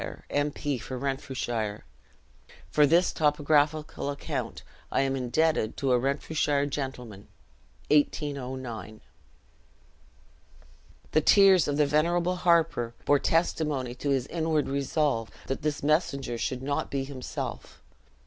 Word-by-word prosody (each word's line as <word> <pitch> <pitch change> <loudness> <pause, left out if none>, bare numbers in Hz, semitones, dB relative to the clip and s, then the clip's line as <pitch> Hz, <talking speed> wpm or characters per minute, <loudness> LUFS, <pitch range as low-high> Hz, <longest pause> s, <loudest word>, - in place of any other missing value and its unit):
M. 145 +1 +1
P. 145 -2 -3
for 130 +3 -6
Renfrewshire. 125 -5 -3 0.9
For 150 +6 +5
this 170 +5 +4
topographical 150 0 +1
account, 140 0 -4 0.3
I - - +2
am 135 0 0
indebted 130 -1 0
to 135 -2 0
a 125 - +4
Renfrewshire 140 +2 0
gentleman. 125 -8 -5 0.6
(1809.) 130 -7 -1 2.1
The 155 - +3
tears 190 0 +6
of 145 0 -1
the 150 - +4
venerable 170 +5 +1
harper 165 -9 +2
bore 145 -1 +4
testimony 150 -6 0
to 135 +3 -4
his 135 -3 +1
inward 160 -1 0
resolve, 140 -4 0 0.2
that 135 - -3
this 150 -1 -2
messenger 140 -5 0
should 130 +1 -2
not 140 +1 -2
be 135 -1 -2
himself. 135 -2 -6
140 Hz, 115 wpm, -28 LUFS, 130-155 Hz, 2.1 s, tears